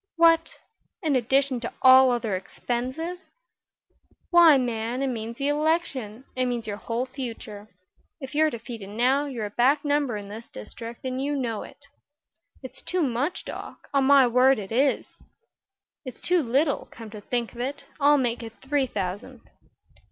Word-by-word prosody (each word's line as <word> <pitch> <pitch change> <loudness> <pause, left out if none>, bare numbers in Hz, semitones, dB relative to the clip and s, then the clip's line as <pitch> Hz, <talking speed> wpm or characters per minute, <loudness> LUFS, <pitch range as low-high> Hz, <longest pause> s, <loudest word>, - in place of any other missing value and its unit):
"What! 330 -1 +4 0.5
In 305 -4 +2
addition 260 +1 +2
to 235 - -5
all 260 0 +8
other 235 -5 0
expenses?" 260 - -4 1.0
"Why, 340 -4 +8
man; 240 0 -2
it 270 - 0
means 230 -1 -5
the 280 0 0
election. 290 -7 -1
It 255 0 +1
means 240 -2 -2
your 205 -1 -4
whole 230 +3 -2
future. 230 -5 -7 0.5
If 265 -1 -8
you're 310 +1 +3
defeated 230 -5 -8
now, 255 +7 +1
you're 240 -6 -4
a - - -4
back 270 +7 +2
number 285 -6 +1
in 205 -1 -8
this 220 +3 -9
district, 230 - -9
and 260 0 -2
you 290 +1 -1
know 235 -6 -2
it." 285 - -13 0.8
"It's 260 0 -9
too 360 -2 -1
much, 270 +5 -1
Doc. - - -9
On 275 -1 +3
my 275 -1 +7
word 255 +2 +4
it 200 -1 -7
is." 265 +4 0 0.8
"It's 255 -5 -9
too 355 -1 +3
little, 280 +3 0
come 225 -3 -11
to 210 -1 -9
think 240 +2 -2
of 240 - -12
it. 275 +3 -4
I'll 290 +1 +5
make 245 -3 -1
it 225 -1 -8
three 270 0 0
thousand." 205 +5 -5
255 Hz, 165 wpm, -25 LUFS, 230-280 Hz, 1.0 s, all